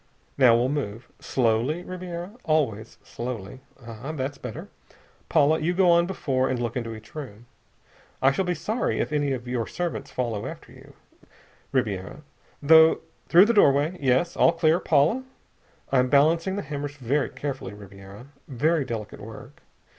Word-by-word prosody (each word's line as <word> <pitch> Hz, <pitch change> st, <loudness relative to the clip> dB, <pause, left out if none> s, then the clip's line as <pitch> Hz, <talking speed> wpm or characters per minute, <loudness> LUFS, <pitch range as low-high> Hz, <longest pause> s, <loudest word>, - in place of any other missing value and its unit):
"Now 125 Hz, -4 st, +6 dB
we'll 120 Hz, +2 st, +2 dB
move. 130 Hz, -6 st, -4 dB
Slowly, 125 Hz, +7 st, 0 dB
Ribiera! 180 Hz, 0 st, -6 dB
Always 130 Hz, -, -1 dB
slowly.... 120 Hz, -2 st, -6 dB, 0.3 s
Ah! 115 Hz, +5 st, -7 dB
That's 140 Hz, -1 st, -4 dB
better! 125 Hz, -4 st, -7 dB, 0.6 s
Paula, 155 Hz, 0 st, +3 dB
you 175 Hz, +3 st, -1 dB
go 180 Hz, -1 st, +4 dB
on 170 Hz, 0 st, +4 dB
before 135 Hz, -8 st, -1 dB
and 130 Hz, -2 st, -1 dB
look 120 Hz, -1 st, -3 dB
into 115 Hz, -3 st, -4 dB
each 110 Hz, -1 st, -14 dB
room. 120 Hz, -7 st, -8 dB, 0.7 s
I 135 Hz, -, +4 dB
shall 190 Hz, -, 0 dB
be 180 Hz, -1 st, -1 dB
sorry 220 Hz, +9 st, -2 dB
if -, -, -1 dB
any 145 Hz, -2 st, +1 dB
of 125 Hz, -1 st, -6 dB
your 125 Hz, -2 st, -2 dB
servants 175 Hz, -1 st, -4 dB
follow 115 Hz, -5 st, -3 dB
after -, -, -10 dB
you, -, -, -16 dB, 0.8 s
Ribiera.... 105 Hz, -1 st, -2 dB, 0.5 s
Through 160 Hz, +3 st, +5 dB
the 235 Hz, -, +2 dB
doorway. 150 Hz, -4 st, +4 dB
Yes! 135 Hz, +5 st, +1 dB
All 170 Hz, -, +4 dB
clear, 165 Hz, 0 st, +2 dB
Paula? 170 Hz, -, +2 dB, 0.7 s
I'm 125 Hz, -1 st, +3 dB
balancing 165 Hz, +7 st, +3 dB
the 200 Hz, -, -3 dB
hammers 145 Hz, -1 st, -5 dB
very 140 Hz, +2 st, -1 dB
carefully, 135 Hz, -9 st, -5 dB
Ribiera. 100 Hz, +2 st, -12 dB, 0.2 s
Very 150 Hz, +4 st, +1 dB
delicate 110 Hz, -4 st, -6 dB
work. -, -, -11 dB
140 Hz, 150 wpm, -25 LUFS, 120-165 Hz, 0.8 s, Now